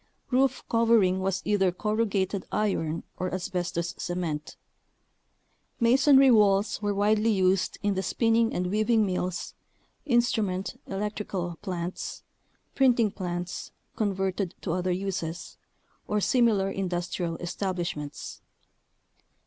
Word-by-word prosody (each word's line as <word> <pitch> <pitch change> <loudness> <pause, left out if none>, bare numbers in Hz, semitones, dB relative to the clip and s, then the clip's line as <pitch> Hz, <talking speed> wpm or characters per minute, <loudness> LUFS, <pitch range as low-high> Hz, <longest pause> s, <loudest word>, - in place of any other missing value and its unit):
Roof 260 +1 +2
covering 230 -5 +3
was 190 0 -1
either 195 -3 +2
corrugated 200 -1 -1
iron 170 -6 -1 0.2
or 185 0 -2
asbestos 175 -2 -2
cement. 170 -4 -3 1.2
Masonry 270 +3 +6
walls 205 -2 +3
were 205 -1 0
widely 210 +2 +2
used 190 -2 +2
in 205 0 +2
the 190 - -1
spinning 225 +4 +2
and 180 0 -2
weaving 215 +1 +3
mills, 180 -2 -3 0.5
instrument 220 -7 +1
(electrical) 195 -3 -3
plants, 180 -3 -5 0.5
printing 240 -5 +3
plants 175 -2 -4 0.3
(converted 195 -3 -1
to - - -2
other 180 +1 -1
uses), 180 -2 -4 0.5
or 210 - +1
similar 210 -4 +2
industrial 175 -3 -2
establishments. 175 -5 -4
195 Hz, 100 wpm, -27 LUFS, 180-215 Hz, 1.2 s, Masonry